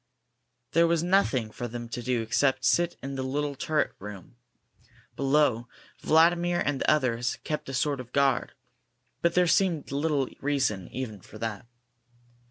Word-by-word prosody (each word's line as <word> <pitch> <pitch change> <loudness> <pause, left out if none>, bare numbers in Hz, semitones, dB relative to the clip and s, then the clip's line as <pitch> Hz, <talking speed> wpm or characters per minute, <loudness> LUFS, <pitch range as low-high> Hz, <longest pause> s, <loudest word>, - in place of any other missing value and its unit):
There 170 +1 +4
was 165 -1 +1
nothing 175 - +2
for 120 - -5
them 120 0 -6
to 120 - -5
do 120 -2 0
except 130 +3 +1
sit 175 +4 +2
in 135 0 -4
the 135 - -3
little 145 +2 -2
turret 155 +2 0
room. 100 +1 -10 0.8
Below, 135 -4 +2 0.3
Vladimir 175 +2 +3
and 145 -2 -1
the - - +2
others 125 -5 +1
kept 150 -3 -4
a - - -5
sort 140 +1 0
of 125 -1 -9
guard, 140 -3 +1 0.7
but 170 0 +1
there 180 0 +5
seemed 170 -4 +1
little 140 -1 0
reason 135 -10 0
even 115 -6 -6
for 110 - -13
that. 110 -1 -5
135 Hz, 155 wpm, -27 LUFS, 120-155 Hz, 0.8 s, there